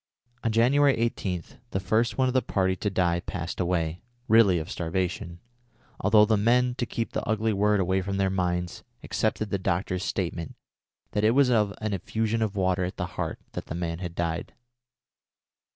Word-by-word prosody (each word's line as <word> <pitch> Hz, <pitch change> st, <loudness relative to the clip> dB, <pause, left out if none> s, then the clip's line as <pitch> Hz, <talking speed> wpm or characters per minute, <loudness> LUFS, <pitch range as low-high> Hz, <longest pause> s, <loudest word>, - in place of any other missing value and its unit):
On 115 Hz, -, +1 dB
January 135 Hz, +5 st, +4 dB
18 95 Hz, -6 st, -1 dB, 0.3 s
the 95 Hz, -, -1 dB
first 110 Hz, +4 st, +1 dB
one 130 Hz, -, +3 dB
of 130 Hz, -, 0 dB
the 130 Hz, -, +3 dB
party 95 Hz, -4 st, 0 dB
to 105 Hz, -, -2 dB
die 90 Hz, -3 st, +1 dB
passed 85 Hz, 0 st, -5 dB
away, 85 Hz, -2 st, -1 dB, 0.3 s
really 110 Hz, -5 st, +6 dB
of 80 Hz, +4 st, -4 dB
starvation, 85 Hz, 0 st, -3 dB, 0.6 s
although 105 Hz, 0 st, +5 dB
the 110 Hz, 0 st, +2 dB
men, 125 Hz, +4 st, +3 dB
to 120 Hz, -, 0 dB
keep 115 Hz, -1 st, -3 dB
the -, -, -2 dB
ugly 110 Hz, 0 st, +1 dB
word 105 Hz, +1 st, +2 dB
away 95 Hz, +1 st, +1 dB
from 100 Hz, +1 st, -3 dB
their 95 Hz, -1 st, +1 dB
minds, 90 Hz, -2 st, -1 dB, 0.2 s
accepted 110 Hz, -1 st, -1 dB
the 100 Hz, -, 0 dB
doctor's 90 Hz, +1 st, -1 dB
statement 85 Hz, -5 st, -3 dB, 0.6 s
that 105 Hz, -, 0 dB
it 110 Hz, +3 st, +4 dB
was 135 Hz, -2 st, +5 dB
of 105 Hz, -4 st, +3 dB
an 110 Hz, -1 st, -1 dB
effusion 110 Hz, +4 st, -1 dB
of 110 Hz, -2 st, -1 dB
water 95 Hz, -1 st, +1 dB
at 90 Hz, -, -4 dB
the -, -, -1 dB
heart -, -, -3 dB
that -, -, -6 dB
the -, -, -5 dB
man 85 Hz, -1 st, -3 dB
had 90 Hz, -2 st, -5 dB
died. 85 Hz, -1 st, -3 dB
95 Hz, 185 wpm, -27 LUFS, 90-110 Hz, 0.6 s, really